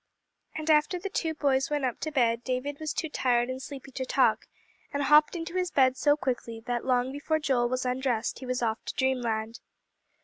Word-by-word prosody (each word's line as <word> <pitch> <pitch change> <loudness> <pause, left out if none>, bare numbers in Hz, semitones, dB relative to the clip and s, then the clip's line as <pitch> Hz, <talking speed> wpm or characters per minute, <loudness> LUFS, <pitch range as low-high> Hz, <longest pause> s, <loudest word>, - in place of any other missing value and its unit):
And 315 0 0
after 305 +5 +3
the 385 +2 -5
two 320 -3 -1
boys 275 0 +1
went 295 -2 0
up 250 - -2
to 310 - -3
bed, 235 -4 +1
David 265 +3 -3
was 310 -1 -3
too 325 - -2
tired 245 -4 +1
and 260 +1 -6
sleepy 275 0 -9
to 260 - -4
talk, 255 - +2 0.4
and 285 0 -1
hopped 300 +4 +5
into 335 0 -5
his 365 -1 0
bed 260 -4 +3
so 290 +2 +3
quickly 240 -5 -3
that 245 -1 -2
long 255 0 +1
before 290 +3 -1
Joel 260 -6 +1
was 255 +1 -2
undressed 250 -3 -1
he 260 - -8
was 250 -1 -1
off 225 0 -1
to - - -5
dreamland. 235 -4 -1
265 Hz, 205 wpm, -28 LUFS, 245-300 Hz, 0.4 s, hopped